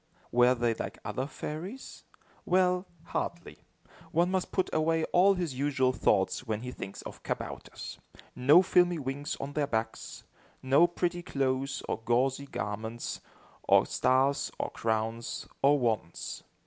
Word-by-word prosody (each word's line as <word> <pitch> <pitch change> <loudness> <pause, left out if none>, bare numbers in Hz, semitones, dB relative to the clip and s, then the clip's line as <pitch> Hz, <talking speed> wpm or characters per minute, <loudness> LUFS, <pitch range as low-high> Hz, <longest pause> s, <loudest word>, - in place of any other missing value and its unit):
Were 125 +1 +5
they 120 -1 +1
like - - -5
other 110 +6 -2
fairies? 175 - -7 0.4
Well, 180 0 +2 0.2
hardly. 170 - -4 0.5
One 175 +3 +2
must 190 -1 -1
put 185 - +1
away 160 +1 +2
all 195 +3 +6
his 175 -6 -2
usual 130 -1 +1
thoughts, 100 +2 +1
when 110 -1 -1
he 125 - -5
thinks 100 - -8
of - - -9
kabouters. - - -6 0.4
No 145 +8 +6
filmy 180 -1 +4
wings 140 +1 -4
on 140 +1 -5
their 145 -1 0
backs! 110 -3 -3 0.4
No 140 +6 +5
pretty 175 0 -1
clothes 135 -3 -1
or - - -2
gauzy 130 +4 +1
garments, 110 +1 -4 0.4
or - - +5
stars, 135 +2 +2
or - - -2
crowns, 115 +1 -2 0.2
or 145 +2 +5
wands! 110 -9 -2
135 Hz, 135 wpm, -30 LUFS, 120-170 Hz, 0.5 s, all